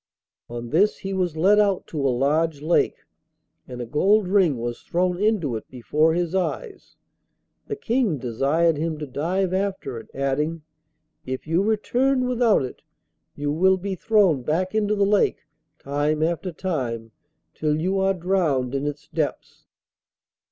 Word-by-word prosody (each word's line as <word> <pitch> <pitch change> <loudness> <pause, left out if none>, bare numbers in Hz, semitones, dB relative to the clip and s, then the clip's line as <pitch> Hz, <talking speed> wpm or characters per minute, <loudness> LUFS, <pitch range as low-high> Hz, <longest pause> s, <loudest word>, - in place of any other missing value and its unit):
On 120 0 -6
this 195 +7 +3
he 195 0 -5
was 180 -4 -1
led 200 +6 +5
out 200 -3 +2
to 150 - -4
a - - +3
large 145 +4 +1
lake, 170 +2 +1 0.7
and 125 -1 -8
a 120 - -3
gold 195 - +2
ring 180 -8 +3
was 120 0 -4
thrown 180 +1 -1
into 205 - +1
it 110 - -10
before 150 +6 +1
his 175 -1 -1
eyes. 390 - -3 0.7
The 425 - -3
King 240 - 0
desired 140 +7 +1
him 160 +1 -2
to 150 - -5
dive 175 +7 -1
after 190 -10 -2
it, 115 - -14
adding, 150 +4 -1 0.6
'If 130 0 -5
you 165 +3 +1
return 250 +5 +1
without 240 - +3
it 125 - -9 0.5
you 145 0 -2
will 190 +5 +3
be 195 +1 -4
thrown 190 - +3
back 170 +8 -1
into 210 -1 +1
the 200 -1 +2
lake 205 0 +2 0.4
time 145 +2 -1
after 170 +3 -1
time, 125 -11 -3 0.4
till 150 0 0
you 190 +4 0
are 195 0 +2
drowned 165 -9 0
in 140 +1 -1
its 145 +2 -6
depths. 155 -3 -4
165 Hz, 155 wpm, -23 LUFS, 145-195 Hz, 0.7 s, led